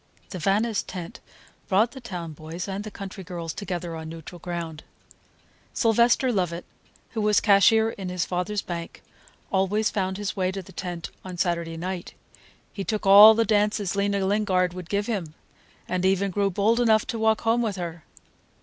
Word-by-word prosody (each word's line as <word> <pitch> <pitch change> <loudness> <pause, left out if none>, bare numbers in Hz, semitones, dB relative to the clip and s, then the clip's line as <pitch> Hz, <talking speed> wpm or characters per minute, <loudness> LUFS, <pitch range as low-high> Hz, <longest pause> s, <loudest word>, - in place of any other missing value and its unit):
The 185 - -5
Vannis' 205 +5 +1
tent 175 -3 -8 0.5
brought 215 +5 +3
the 265 - -10
town 175 -8 -6
boys 160 +5 -7
and 195 +1 -4
the 215 - -6
country 195 -1 -8
girls 170 -2 -5
together 175 -4 -4
on 160 0 -7
neutral 165 +2 -9
ground. 170 -2 -5 0.9
Sylvester 235 +2 +3
Lovett, 175 -4 -1 0.5
who 225 - -2
was 210 0 +4
cashier 220 +3 +5
in 195 -4 -6
his 180 -1 -1
father's 190 +3 -2
bank, 170 -1 -7 0.5
always 200 +3 +1
found 190 -2 -1
his 205 -1 -3
way 185 -1 0
to 195 0 -5
the 190 - -14
tent 175 -2 -6
on 185 -1 -7
Saturday 170 -2 -1
night. 180 +1 -5 0.6
He 200 - -4
took 215 +1 -3
all 205 +3 +10
the 230 0 +2
dances 205 -2 +1
Lena 200 -1 0
Lingard 190 -3 +1
would 180 -2 -8
give 205 0 0
him, 185 -9 -3 0.5
and 185 0 -1
even 195 +1 +2
grew 200 +1 +1
bold 210 +5 +2
enough 220 -3 +4
to 230 - -4
walk 220 0 +2
home 230 +1 +2
with 215 -4 -1
her. 170 -3 -6
195 Hz, 175 wpm, -25 LUFS, 175-210 Hz, 0.9 s, all